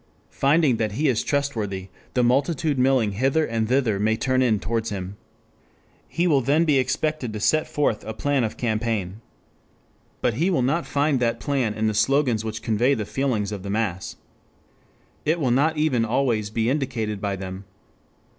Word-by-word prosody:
Finding 140 Hz, -3 st, +3 dB
that 110 Hz, -2 st, -1 dB
he 150 Hz, +8 st, 0 dB
is 120 Hz, -4 st, +1 dB
trustworthy, 110 Hz, -10 st, -2 dB, 0.3 s
the 125 Hz, -, +3 dB
multitude 140 Hz, +3 st, +1 dB
milling 125 Hz, -5 st, +3 dB
hither 135 Hz, +9 st, +1 dB
and 115 Hz, -3 st, -2 dB
thither 125 Hz, -6 st, +1 dB
may 110 Hz, +2 st, +2 dB
turn 130 Hz, +1 st, +1 dB
in 115 Hz, -5 st, +2 dB
towards 115 Hz, +2 st, -2 dB
him. 95 Hz, -1 st, -5 dB, 0.9 s
He 170 Hz, -, -1 dB
will 145 Hz, -6 st, +3 dB
then 145 Hz, +6 st, +2 dB
be 145 Hz, -4 st, +3 dB
expected 135 Hz, 0 st, -1 dB
to 105 Hz, -, -4 dB
set 155 Hz, +8 st, +2 dB
forth 145 Hz, -7 st, 0 dB
a 110 Hz, -, -5 dB
plan 140 Hz, +2 st, 0 dB
of 110 Hz, -, -3 dB
campaign. 110 Hz, -4 st, -2 dB, 1.0 s
But 120 Hz, -, +1 dB
he 165 Hz, -, +1 dB
will 170 Hz, -9 st, +1 dB
not 155 Hz, +7 st, 0 dB
find 145 Hz, -1 st, +1 dB
that 115 Hz, -1 st, 0 dB
plan 130 Hz, -6 st, -1 dB
in 110 Hz, 0 st, -1 dB
the 110 Hz, -, +1 dB
slogans 120 Hz, +1 st, +2 dB
which 110 Hz, 0 st, -5 dB
convey 120 Hz, +5 st, +2 dB
the 105 Hz, -, -3 dB
feelings 105 Hz, -2 st, -1 dB
of 100 Hz, -2 st, -5 dB
the 100 Hz, -, -7 dB
mass. 100 Hz, -3 st, -2 dB, 1.1 s
It 160 Hz, +3 st, +1 dB
will 130 Hz, -6 st, +1 dB
not 150 Hz, +5 st, +2 dB
even 145 Hz, -7 st, +2 dB
always 115 Hz, -3 st, 0 dB
be 110 Hz, +1 st, -1 dB
indicated 120 Hz, -7 st, -2 dB
by 100 Hz, -1 st, -1 dB
them. 95 Hz, 0 st, -7 dB
120 Hz, 175 wpm, -24 LUFS, 110-140 Hz, 1.1 s, Finding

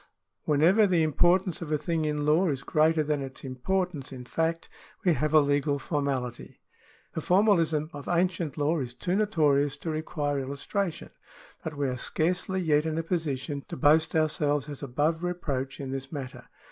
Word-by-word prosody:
Whenever 170 Hz, +9 st, +4 dB
the 175 Hz, -4 st, +3 dB
importance 175 Hz, +3 st, +2 dB
of 160 Hz, -2 st, -5 dB
a 150 Hz, -, +3 dB
thing 160 Hz, +1 st, -1 dB
in 150 Hz, -1 st, -1 dB
law 165 Hz, +5 st, +3 dB
is 135 Hz, -3 st, -2 dB
greater 155 Hz, +2 st, +3 dB
than 150 Hz, -1 st, -1 dB
its 135 Hz, -1 st, -7 dB
importance 145 Hz, +3 st, -2 dB
in 125 Hz, -2 st, -8 dB
fact, 165 Hz, +5 st, -1 dB, 0.4 s
we 175 Hz, -, +5 dB
have 155 Hz, 0 st, 0 dB
a 155 Hz, -, +7 dB
legal 145 Hz, 0 st, +1 dB
formality. 135 Hz, -5 st, -3 dB, 0.5 s
The 160 Hz, -, -3 dB
formalism 170 Hz, -5 st, +3 dB
of 145 Hz, -1 st, -8 dB
ancient 175 Hz, -3 st, 0 dB
law 155 Hz, +3 st, +1 dB
is 125 Hz, -3 st, -5 dB
too 180 Hz, +6 st, -1 dB
notorious 150 Hz, -9 st, +2 dB
to 160 Hz, +3 st, -4 dB
require 150 Hz, -2 st, -2 dB
illustration, 145 Hz, +7 st, -3 dB, 0.5 s
but 155 Hz, -2 st, -5 dB
we 140 Hz, -1 st, 0 dB
are 125 Hz, -1 st, -2 dB
scarcely 180 Hz, +7 st, -1 dB
yet 155 Hz, -2 st, +2 dB
in 160 Hz, 0 st, -2 dB
a 165 Hz, -, -1 dB
position 145 Hz, -4 st, -2 dB
to 170 Hz, -, -6 dB
boast 160 Hz, +2 st, +4 dB
ourselves 150 Hz, -2 st, +1 dB
as 145 Hz, -2 st, -7 dB
above 150 Hz, +5 st, 0 dB
reproach 140 Hz, -7 st, -3 dB
in 135 Hz, -2 st, -5 dB
this 135 Hz, 0 st, -5 dB
matter. 130 Hz, -4 st, -7 dB
155 Hz, 170 wpm, -28 LUFS, 140-170 Hz, 0.5 s, a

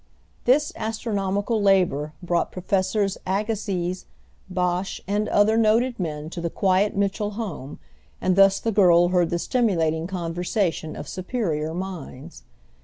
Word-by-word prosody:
This 290 Hz, +4 st, +3 dB
astronomical 210 Hz, -1 st, -1 dB
labor 180 Hz, -7 st, +2 dB
brought 175 Hz, -1 st, 0 dB
Professors 190 Hz, +2 st, 0 dB
Agassiz, 190 Hz, -3 st, -2 dB, 0.4 s
Bache, 180 Hz, +1 st, -1 dB
and 205 Hz, +2 st, 0 dB
other 215 Hz, +2 st, +4 dB
noted 230 Hz, +2 st, +2 dB
men 155 Hz, -4 st, -3 dB
to 175 Hz, -, -5 dB
the 170 Hz, -, -1 dB
quiet 195 Hz, +4 st, +1 dB
Mitchell 200 Hz, +1 st, -1 dB
home, 165 Hz, -, -5 dB, 0.4 s
and 185 Hz, -1 st, +1 dB
thus 195 Hz, 0 st, +5 dB
the 225 Hz, -, -1 dB
girl 175 Hz, -4 st, +5 dB
heard 180 Hz, -2 st, +2 dB
the 170 Hz, -, 0 dB
stimulating 170 Hz, -7 st, 0 dB
conversation 175 Hz, -1 st, -2 dB
of 145 Hz, -, -7 dB
superior 170 Hz, -, -2 dB
minds. 170 Hz, -, -7 dB
190 Hz, 125 wpm, -24 LUFS, 170-210 Hz, 0.4 s, thus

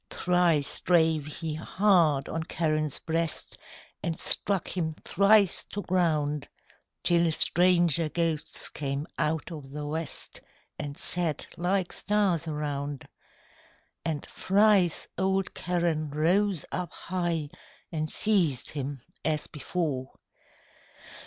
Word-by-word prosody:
Thrice 175 Hz, -5 st, +2 dB
drave 160 Hz, -4 st, +3 dB
he 160 Hz, +1 st, -4 dB
hard 165 Hz, -3 st, +2 dB
on 165 Hz, 0 st, -3 dB
Charon's 155 Hz, -3 st, 0 dB
breast, 165 Hz, -1 st, -1 dB, 0.5 s
And 165 Hz, -1 st, -2 dB
struck 195 Hz, -3 st, +2 dB
him 160 Hz, -3 st, -2 dB
thrice 200 Hz, 0 st, +4 dB
to 205 Hz, -, -6 dB
ground, 155 Hz, -5 st, 0 dB, 0.6 s
Till 170 Hz, -1 st, +4 dB
stranger 170 Hz, -1 st, +4 dB
ghosts 165 Hz, -2 st, -1 dB
came 140 Hz, 0 st, -3 dB
out 160 Hz, +3 st, -1 dB
o' 155 Hz, -3 st, -6 dB
the 145 Hz, +2 st, -7 dB
west 155 Hz, +1 st, -2 dB, 0.4 s
And 145 Hz, -1 st, -5 dB
sat 170 Hz, -4 st, +1 dB
like 180 Hz, +1 st, 0 dB
stars 195 Hz, -6 st, +1 dB
around. 145 Hz, -2 st, -4 dB, 1.0 s
And 155 Hz, -3 st, -3 dB
thrice 195 Hz, -3 st, +2 dB
old 190 Hz, 0 st, 0 dB
Charon 170 Hz, -4 st, -1 dB
rose 175 Hz, +4 st, +1 dB
up 180 Hz, -1 st, -3 dB
high 170 Hz, -4 st, -3 dB, 0.4 s
And 155 Hz, -1 st, -2 dB
seized 175 Hz, -, +1 dB
him 140 Hz, -3 st, -5 dB, 0.2 s
as 155 Hz, -1 st, 0 dB
before. 150 Hz, -4 st, -3 dB
165 Hz, 105 wpm, -28 LUFS, 150-180 Hz, 1.0 s, thrice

